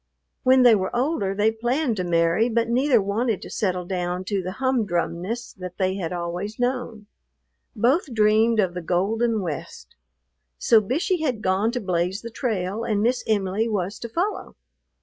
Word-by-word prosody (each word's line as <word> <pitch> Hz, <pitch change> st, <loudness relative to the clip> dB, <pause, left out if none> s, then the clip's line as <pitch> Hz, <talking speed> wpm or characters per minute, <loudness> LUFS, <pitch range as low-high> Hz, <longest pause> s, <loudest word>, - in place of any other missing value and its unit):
When 260 Hz, 0 st, +5 dB
they 240 Hz, -2 st, +8 dB
were 190 Hz, +1 st, 0 dB
older 240 Hz, -7 st, 0 dB
they 210 Hz, +2 st, +3 dB
planned 240 Hz, +2 st, -1 dB
to 185 Hz, -, -1 dB
marry, 170 Hz, +6 st, +2 dB
but 230 Hz, 0 st, +1 dB
neither 250 Hz, +1 st, +3 dB
wanted 210 Hz, +1 st, 0 dB
to -, -, -9 dB
settle 180 Hz, -3 st, -1 dB
down 180 Hz, 0 st, -2 dB
to 195 Hz, 0 st, -1 dB
the 185 Hz, +1 st, -5 dB
humdrumness 220 Hz, -3 st, -2 dB
that 180 Hz, -1 st, -7 dB
they 190 Hz, -1 st, +1 dB
had 170 Hz, -4 st, -3 dB
always 175 Hz, +4 st, -4 dB
known. 245 Hz, -3 st, -2 dB, 0.7 s
Both 260 Hz, -, +1 dB
dreamed 220 Hz, +1 st, +3 dB
of 185 Hz, -4 st, +2 dB
the 180 Hz, -, -5 dB
golden 210 Hz, +6 st, 0 dB
West; 155 Hz, -6 st, -6 dB, 0.6 s
so 225 Hz, -2 st, +4 dB
Bishey 310 Hz, -, -1 dB
had 250 Hz, -8 st, -1 dB
gone 190 Hz, +4 st, +2 dB
to 250 Hz, -, -1 dB
blaze 185 Hz, 0 st, -1 dB
the 230 Hz, -, -7 dB
trail, 215 Hz, -3 st, -2 dB
and 210 Hz, -2 st, 0 dB
"Miss 245 Hz, +2 st, +1 dB
Em'ly" 205 Hz, +1 st, 0 dB
was 200 Hz, -2 st, -2 dB
to 235 Hz, -, -6 dB
follow. 365 Hz, -, -3 dB
215 Hz, 170 wpm, -24 LUFS, 185-240 Hz, 0.7 s, they